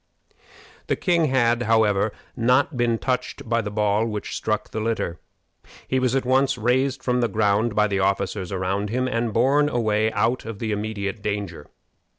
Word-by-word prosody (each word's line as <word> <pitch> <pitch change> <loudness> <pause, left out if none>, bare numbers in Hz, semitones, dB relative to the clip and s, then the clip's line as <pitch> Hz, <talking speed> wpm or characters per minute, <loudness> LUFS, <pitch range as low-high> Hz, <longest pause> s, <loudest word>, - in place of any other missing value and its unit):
The - - +1
king 170 -3 +2
had, 120 -4 +2
however, 110 -2 +2 0.2
not 125 +5 +2
been 120 -2 +1
touched 130 +2 -3
by 115 0 +1
the 105 - -4
ball 105 0 +1
which 105 -2 -4
struck 110 -1 -2
the 110 - -3
litter. 110 -6 -2 0.7
He 130 - +1
was 130 0 +1
at 135 - 0
once 135 +1 +2
raised 125 +3 0
from 125 -1 +1
the 120 - +2
ground 105 0 +1
by 105 - +4
the 100 -2 -1
officers 95 -1 -1
around 95 +2 -1
him, 130 +3 0
and 115 -2 -1
borne 140 +6 +3
away 110 -3 +1
out 120 +3 0
of 115 -2 -7
the 110 +1 -3
immediate 105 -1 -3
danger. 100 -7 -4
115 Hz, 170 wpm, -23 LUFS, 105-125 Hz, 0.7 s, by